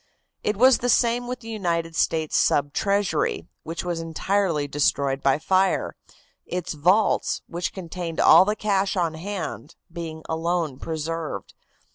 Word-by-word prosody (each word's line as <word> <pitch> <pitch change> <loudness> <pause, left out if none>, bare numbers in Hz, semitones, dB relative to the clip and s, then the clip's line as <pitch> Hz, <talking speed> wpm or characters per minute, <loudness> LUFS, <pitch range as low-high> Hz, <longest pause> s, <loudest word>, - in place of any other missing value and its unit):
It 210 - 0
was 255 +3 +6
the 245 - -1
same 240 0 +2
with 250 0 -5
the 225 - -11
United 170 -6 -2
States 160 -2 0
Sub 145 0 +2
Treasury, 200 -4 0 0.2
which 165 +2 -5
was 175 -2 -2
entirely 165 -1 0
destroyed 140 -1 +1
by 135 0 +3
fire, 190 +4 +1 0.5
its 180 -2 -4
vaults, 180 +8 +2
which 175 +1 -3
contained 175 -2 -6
all - - +8
the 210 +2 0
cash 200 -2 0
on 170 -3 +1
hand, 170 -2 -6 0.2
being 160 -2 -6
alone 160 -3 -1
preserved. 160 - -4
170 Hz, 140 wpm, -24 LUFS, 160-200 Hz, 0.5 s, all